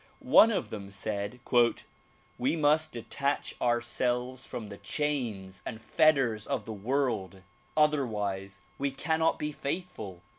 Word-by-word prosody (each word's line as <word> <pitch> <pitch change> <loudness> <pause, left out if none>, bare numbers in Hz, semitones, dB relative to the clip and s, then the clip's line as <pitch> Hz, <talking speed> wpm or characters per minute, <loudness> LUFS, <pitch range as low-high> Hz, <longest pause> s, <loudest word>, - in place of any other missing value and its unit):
One 225 - +9
of 225 - -1
them 100 -2 -6
said 100 +3 -3 1.0
"We 135 +6 +1
must 155 0 +3
detach 140 +5 -1
ourselves 125 +1 0
from 110 -3 -6
the 100 - -9
chains 105 -4 -2
and 110 - -6
fetters 130 -6 +3
of - - -2
the 110 - -5
world; 105 -5 -1 0.3
otherwise 105 -10 +1 0.2
we 140 0 +1
cannot 160 +4 +1
be 150 0 -2
faithful." 140 - -5
120 Hz, 120 wpm, -30 LUFS, 100-145 Hz, 1.0 s, One